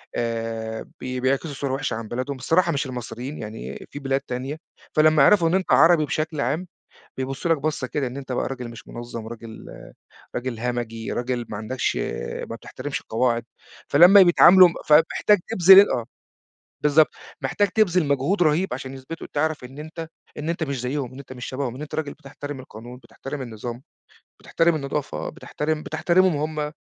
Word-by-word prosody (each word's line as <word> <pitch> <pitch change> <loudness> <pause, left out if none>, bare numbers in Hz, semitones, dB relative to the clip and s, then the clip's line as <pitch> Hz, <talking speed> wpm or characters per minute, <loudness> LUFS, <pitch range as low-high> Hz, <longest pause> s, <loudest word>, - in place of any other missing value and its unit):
آآ، 115 -1 -3
بي 130 0 -4
بيعكسوا 135 +4 0
صورة 135 -1 -3
وحشة 135 -3 -2
عن 115 -1 -6
بلادهم، 130 +4 -3
الصراحة 170 +6 +2
مش 140 -1 -1
المصريين 125 +2 -6
يعني 105 - -7
في 145 - -7
بلاد 135 0 -1
تانية، 135 +3 -5 0.4
فلمّا 155 -1 +5
يعرفوا 170 0 +5
إن - - -1
أنت 190 - -1
عربي 165 -2 +6
بشكل 155 0 -2
عام، 155 +9 -1 0.5
بيبُصّوا 135 +5 -3
لك - - +2
بصّة 145 -3 -2
كده 140 +1 -2
إن 125 +2 -6
أنت 135 -2 -6
بقى - - -1
راجل 125 -3 -6
مش 115 - -12
منظَّم 120 -2 -7
راجل 115 -1 -10 0.7
راجل 125 -2 -3
همَجي، 120 -2 -3
راجل 120 -1 -2
ما 105 - -5
عندكش 120 +5 -2 0.5
ما 115 - -4
بتحترمش 135 +4 -6
القواعد، 120 0 0 0.4
فلمّا 180 +7 +8
بيتعاملوا 180 +1 +8
م - - -7
فمحتاج 165 +6 +4
تبذل 195 -2 +7
أ - - +1
آه 120 -2 -3 0.8
بالضبط، 150 +1 +5 0.3
محتاج 205 -1 +1
تبذل 185 -6 +2
مجهود 140 +8 +1
رهيب، 155 +2 +1
عشان 130 +1 -6
يثبتوا 135 +5 -8
تعرف 155 -2 -1
إن 135 +4 -10
أنت 160 +1 -7 0.3
إن 155 +2 -4
أنت 170 -1 -1
مش 140 -4 -3
زيهم، 130 0 -3
إن 135 - -10
أنت 130 -1 -10
مش 125 -1 -7
شبههم، 130 -2 -4
إن 140 - -8
أنت 150 - -6
راجل 150 -3 -3
بتحترم 145 -1 -8
القانون، 120 0 -11
بتحترم 135 +4 -7
النظام، 120 +1 -6 0.6
بتحترم 165 0 +1
النضافة، 140 - -3
بتحترم 155 +1 -3
بتحترمهم 170 +1 +2 0.2
هم. 150 0 -2
140 Hz, 170 wpm, -23 LUFS, 125-155 Hz, 0.8 s, فلمّا